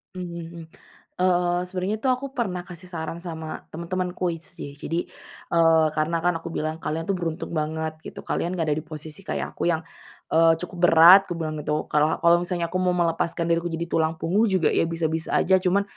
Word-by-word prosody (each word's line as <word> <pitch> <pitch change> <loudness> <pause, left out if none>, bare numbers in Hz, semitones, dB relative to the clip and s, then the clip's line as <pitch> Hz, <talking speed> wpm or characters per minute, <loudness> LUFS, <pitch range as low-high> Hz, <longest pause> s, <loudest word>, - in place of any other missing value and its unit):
Mmm, 170 -2 -7 0.5
eee, 175 -1 +2
sebenernya 190 +3 -2
tuh 260 - +2
aku 255 +2 0
pernah 180 -7 -2
kasih 180 0 -12
saran 165 0 -5
sama 160 -3 -6
temen-temenku 180 +2 -3
HD. 165 -4 -10
Jadi, 165 +4 -3 0.5
eee, 165 -1 +5
karena 155 +2 0
kan 175 0 +2
aku - - -6
bilang, 155 0 -3
"Kalian 165 +1 -3
tuh 195 - 0
beruntung 170 -1 -4
banget 155 0 -2
gitu, - - -9
kalian 175 +2 -1
enggak 165 -3 -1
ada - - 0
di - - -4
posisi 155 +3 -8
kayak - - -4
aku 175 - 0
yang, 160 -1 0 0.5
eee, 165 0 +6
cukup 180 +1 -7
berat," 170 +4 +9
kubilang 160 -2 -3
gitu, 150 +1 -1
"kalau 150 +1 +2
kalau 170 0 +6
misalnya 175 -1 -1
aku 185 - -1
mau 180 -1 +2
melepaskan 170 -1 0
diri 165 - +4
aku 175 - -3
jadi 165 +1 -3
tulang 160 0 +1
punggung 200 +9 +2
juga, 185 -5 +2
ya - - +3
bisa-bisa 165 -1 -2
aja, 190 0 +4
cuman 190 +2 +2
170 Hz, 190 wpm, -24 LUFS, 160-180 Hz, 0.5 s, berat